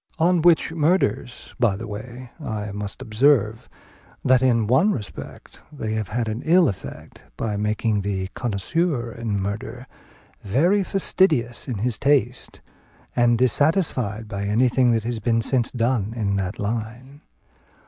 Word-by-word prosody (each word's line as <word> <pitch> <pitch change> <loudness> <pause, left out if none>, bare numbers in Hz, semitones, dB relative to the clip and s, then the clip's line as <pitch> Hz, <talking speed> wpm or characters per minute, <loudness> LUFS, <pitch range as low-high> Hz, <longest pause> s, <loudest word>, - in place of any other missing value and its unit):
On 175 +1 +3
which 170 -1 +4
murders, 155 - 0
by 115 -6 +3
the 110 +4 -6
way, 120 +4 -8
I 105 -4 -4
must 100 0 -5
observe, 115 -1 +2 0.6
that 130 -1 +5
in 120 -4 +3
one 130 - +3
respect 100 - -8
they 110 -7 -4
have 110 -2 -2
had 115 +2 -2
an 110 +3 -3
ill 170 +1 +5
effect, 95 - -7 0.2
by 105 -2 -2
making 105 0 0
the 95 -1 -3
connoisseur 120 - -1
in 115 -4 -3
murder 110 +5 -5 0.6
very 170 - +2
fastidious 180 -11 +1
in 125 -5 -3
his 115 +2 -1
taste, 130 -3 0 0.5
and 120 -1 +3
dissatisfied 125 - +1
by 100 -1 -4
anything 125 +4 +3
that 115 -2 +2
has 115 0 -3
been 115 +1 +1
since 125 -2 +1
done 115 -3 -1
in 100 -4 -1
that 95 -1 -3
line. 120 +6 -5
115 Hz, 140 wpm, -23 LUFS, 105-130 Hz, 0.6 s, that